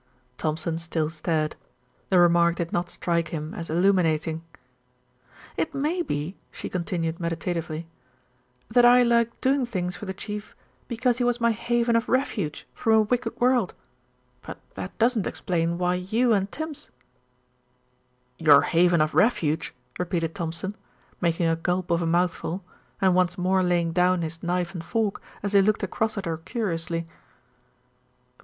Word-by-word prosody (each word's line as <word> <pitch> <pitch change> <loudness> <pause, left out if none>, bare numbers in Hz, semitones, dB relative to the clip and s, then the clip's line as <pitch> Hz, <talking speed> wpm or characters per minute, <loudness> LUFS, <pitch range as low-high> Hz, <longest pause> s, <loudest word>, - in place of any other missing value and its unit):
Thompson 160 +1 -1
still 160 -2 -2
stared. 155 -1 -1 0.5
The 190 - +4
remark 170 -1 +5
did 170 -1 -4
not 175 0 0
strike 170 -2 -1
him 155 -1 -5
as 170 - -6
illuminating. 165 -2 +2 1.1
"It 310 - -1
may 305 +6 0
be," 155 - -3
she - - -7
continued 170 -2 -2
meditatively, 170 -1 -3 0.8
"that 240 +2 +4
I 245 +1 +7
like 235 -1 +2
doing 270 +1 +2
things 185 -6 -3
for 210 - -8
the 190 - -3
Chief 210 +2 -6 0.3
because 240 0 0
he - - +2
was 245 0 +1
my 235 0 +3
haven 235 +1 +1
of 230 +1 +1
refuge 230 - -1
from 225 - +1
a 220 - +6
wicked 235 +2 -1
world; 245 -5 +2 0.7
but - - -8 0.2
that - - -7
doesn't 230 -3 +2
explain 170 -1 -1
why 180 0 +1
you 220 +7 +1
and 195 -1 0
Tims 315 -2 -6 0.7
" 125 0 -42
"Your 145 -2 +9
haven 170 -1 +3
of 155 0 +1
refuge!" 160 -8 +2 0.3
repeated 170 -2 -1
Thompson, 170 +2 -4 0.5
making 170 -1 +1
a 165 - +2
gulp 175 +2 -1
of 170 0 +2
a 165 - 0
mouthful, 175 +1 0 0.4
and 190 -1 +4
once 180 -1 +2
more 185 +1 +2
laying 175 -2 +1
down 180 +1 +2
his 165 +1 -5
knife 175 0 -1
and 170 -3 -6
fork, 220 +2 -1 0.2
as 205 0 -2
he 200 - +7
looked 215 +2 +1
across 220 -1 -1
at 200 - -3
her 165 -1 -2
curiously. 170 -3 -3
180 Hz, 155 wpm, -25 LUFS, 165-220 Hz, 1.1 s, Your